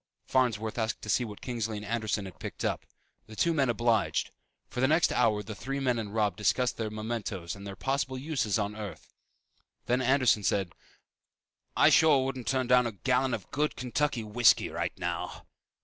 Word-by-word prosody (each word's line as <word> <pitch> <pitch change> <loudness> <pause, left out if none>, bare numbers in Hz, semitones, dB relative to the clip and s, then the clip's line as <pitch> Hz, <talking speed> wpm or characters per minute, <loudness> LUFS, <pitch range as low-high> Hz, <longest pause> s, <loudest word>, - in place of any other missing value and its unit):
Farnsworth 115 -4 0
asked 110 -1 -2
to 110 - -7
see 120 - +2
what 105 -3 -8
Kingsley 115 -4 -3
and 105 - -7
Anderson 110 -2 -1
had 95 - -10
picked - - -5
up. - - -2 0.4
The 110 - -11
two 170 +9 +2
men 135 -5 +2
obliged. 120 -3 +1 0.4
For - - -6
the 130 - +4
next 160 +4 +3
hour 110 -4 +2
the 110 - -7
three 135 +6 -4
men 125 -3 +1
and 105 -3 -5
Robb 105 -2 +1
discussed 125 +3 +1
the 110 -1 -2
mementoes 110 -5 -4
and 100 0 -9
their 100 - -6
possible 135 +1 -1
uses 130 -7 -1
on 105 -1 -2
Earth. 105 -7 -8 0.7
Then 125 +1 +1
Anderson 130 -4 +3
said, 95 -1 0 1.0
"I - - +6
sure 150 -4 +5
wouldn't 130 -2 -4
turn 130 -1 +1
down 125 0 +4
about 115 - -6
a - - -42
gallon 130 -1 +2
of 100 -5 -10
good 150 +2 0
Kentucky 130 -1 -1
whiskey 105 0 +4
right - - -3
now!" - - -4
115 Hz, 190 wpm, -29 LUFS, 105-130 Hz, 1.0 s, I